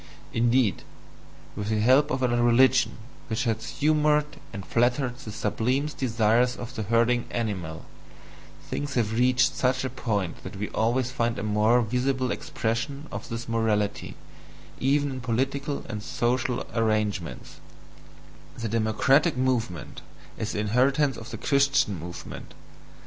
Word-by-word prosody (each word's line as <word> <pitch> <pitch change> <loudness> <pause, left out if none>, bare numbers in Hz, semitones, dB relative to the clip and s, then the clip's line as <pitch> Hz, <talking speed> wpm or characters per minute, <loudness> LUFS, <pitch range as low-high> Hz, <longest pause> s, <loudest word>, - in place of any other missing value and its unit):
Indeed, 120 -2 +2 0.7
with 105 0 -4
the 110 -1 +1
help 130 +7 +4
of 130 -2 -1
a - - +4
religion 120 +2 +4 0.3
which 110 +1 -1
has 115 -2 -1
humoured 150 0 +2 0.3
and 100 -1 -7
flattered 120 +1 +1
the 110 -5 -8
sublimest 125 +8 -1
desires 120 0 +2
of 120 +1 -7
the 110 - -4
herding 115 +3 +2
animal, 95 -9 -3 0.8
things 145 -1 -4
have 110 -3 +1
reached 125 +2 +3
such 130 0 +1
a 130 - -3
point 105 -8 -2
that 95 +3 -8
we 105 +2 -4
always 120 +3 0
find 120 -2 -1
a - - -3
more 110 +3 +3
visible 125 +2 0
expression 115 +6 -3
of - - -6
this 115 0 -5
morality 110 -3 0 0.6
even 140 +2 +2
in 130 -1 -5
political 135 +4 -2
and 105 -1 -5
social 120 +2 -1
arrangements: 105 -6 -1 1.0
the 115 - -3
DEMOCRATIC 115 - +2
movement 125 - -1 0.3
is 110 0 -3
the 105 - -1
inheritance 130 +6 +2
of 115 0 -9
the - - -6
Christian 140 - +2
movement. 85 +2 -9
120 Hz, 135 wpm, -26 LUFS, 110-130 Hz, 1.0 s, help